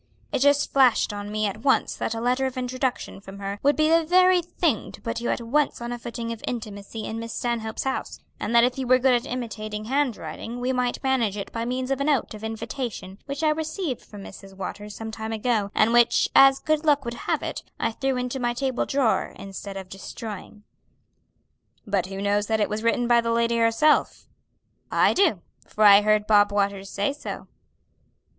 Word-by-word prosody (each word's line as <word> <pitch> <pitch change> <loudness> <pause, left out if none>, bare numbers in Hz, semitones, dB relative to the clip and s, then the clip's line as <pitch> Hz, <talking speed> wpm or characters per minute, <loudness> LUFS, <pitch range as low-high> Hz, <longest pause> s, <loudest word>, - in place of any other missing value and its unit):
"It - - 0
just 285 +1 +3
flashed 255 -6 +4
on 205 0 -6
me 215 0 0
at 205 +2 -3
once 270 +2 +2
that 225 - -3
a - - -3
letter 250 +3 +1
of 260 0 -7
introduction 255 -4 -3
from 195 0 -11
her 200 0 -5
would 285 +1 +3
be 310 0 +3
the 330 +1 +4
very 365 +2 +4
thing 345 - -1
to - - -11
put 230 0 -4
you 240 - -2
at - - -1
once 280 +6 0
on 235 0 -5
a 240 - -4
footing 235 0 -5
of 230 - -11
intimacy 220 -2 -5
in 225 - -4
Miss 230 -1 -6
Stanhope's 235 -3 -2
house; 265 - -3 0.2
and 230 - -2
that 235 - +7
if 250 +2 +1
you 260 - -3
were 255 +1 +6
good 255 0 +3
at 240 +2 0
imitating 215 -3 -5
handwriting 245 -2 -2
we 250 +1 -1
might 250 0 -1
manage 240 -7 +1
it 200 - -6
by 230 0 -3
means 255 +2 -2
of 270 0 0
a - - +2
note 285 -6 +1
of 215 0 -10
invitation 225 -3 -5
which 280 +2 -4
I 310 - +4
received 315 - -2
from 205 -2 -12
Mrs. 195 0 -12
Waters 205 +2 -6
some 220 0 -6
time 220 0 -5
ago, 220 -2 0
and 225 +2 +3
which, 240 0 +4
as 270 0 +8
good 310 +2 0
luck 290 -4 +2
would 235 - -3 0.2
have - - +1
it, - - -4 0.2
I - - 0
threw 265 +3 -1
into 250 +1 -3
my 240 -1 -1
table 260 -1 -1
drawer 270 -5 +1
instead 195 0 -7
of 190 -1 -7
destroying." 205 +2 -8 1.2
"But 200 -4 0
who 195 +1 -5
knows 205 0 +1
that 220 -1 +1
it 210 - +1
was 210 +1 -3
written 235 +1 +1
by 240 -1 +5
the 230 0 -1
lady 235 0 +1
herself?" 230 +7 +2 0.7
"I - - +4
do, 325 - +2 0.2
for 215 - -1
I 205 -1 +9
heard 215 0 +2
Bob 205 -1 +4
Waters 200 -1 -1
say 205 +9 -1
so." 290 - -7
235 Hz, 210 wpm, -25 LUFS, 210-265 Hz, 1.2 s, I